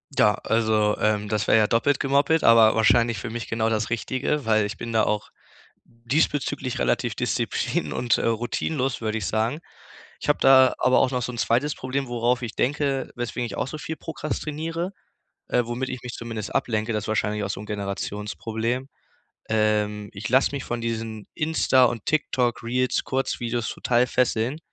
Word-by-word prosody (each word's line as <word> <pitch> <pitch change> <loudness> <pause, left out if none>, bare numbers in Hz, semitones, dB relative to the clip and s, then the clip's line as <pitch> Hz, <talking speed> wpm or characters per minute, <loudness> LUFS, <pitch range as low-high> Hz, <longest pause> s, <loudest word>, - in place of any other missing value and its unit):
Ja, 105 -5 +4
also, 110 -2 +2
ähm, 105 -1 +1
das 110 0 -1
wär - - +5
ja 110 -1 +5
doppelt 130 +5 +2
gemoppelt, 140 +3 +2
aber 115 -1 +7
wahrscheinlich 115 +1 +3
für 115 +4 -5
mich 115 +1 -6
genau 110 0 0
das 110 -1 -1
Richtige, 130 +4 -1
weil 110 -1 +3
ich 105 - -5
bin 115 - -6
da 110 -1 +3
auch 105 0 -1 0.6
diesbezüglich 130 +2 -1
relativ - - 0
disziplin - - -1
und, 120 -2 +1
äh, - - -2
routinenlos, 120 +4 -1
würd 110 -1 -2
ich 110 -4 -2
sagen. 110 - 0 0.6
Ich - - -3
hab 145 - +3
da 130 -1 +7
aber 130 - +4
auch 130 - +2
noch 125 -1 -1
so 125 - -3
'n 120 - -8
2. 135 +7 +1
Problem, 135 +1 -3
worauf 120 +1 0
ich 120 -3 -5
denke, 140 -1 0
weswegen 120 0 -3
ich 115 - -6
auch - - -1
so 155 - -6
viel 160 +1 -5
prokrastiniere, 160 +3 -4 0.6
äh, 125 - +2
womit 120 +3 -3
ich 125 -1 -6
mich 125 -1 -6
zumindest 115 -3 -6
ablenke. 110 0 0
Das 105 -1 -2
wahrscheinlich 105 -1 0
auch 100 - -3
so - - -6
'n - - -8
Generationsproblem. 105 +4 -3 0.6
Ähm, 105 -1 +1
ich 105 +3 -5
lass 130 +3 +3
mich 140 -3 -4
von 120 0 -3
diesen 115 -2 -4
Insta 155 -4 +3
und 115 -3 -3
TikTok-Reels-Kurzvideos 125 -3 0
total 120 0 +1
fesseln. 125 +2 0
120 Hz, 170 wpm, -24 LUFS, 110-130 Hz, 0.6 s, aber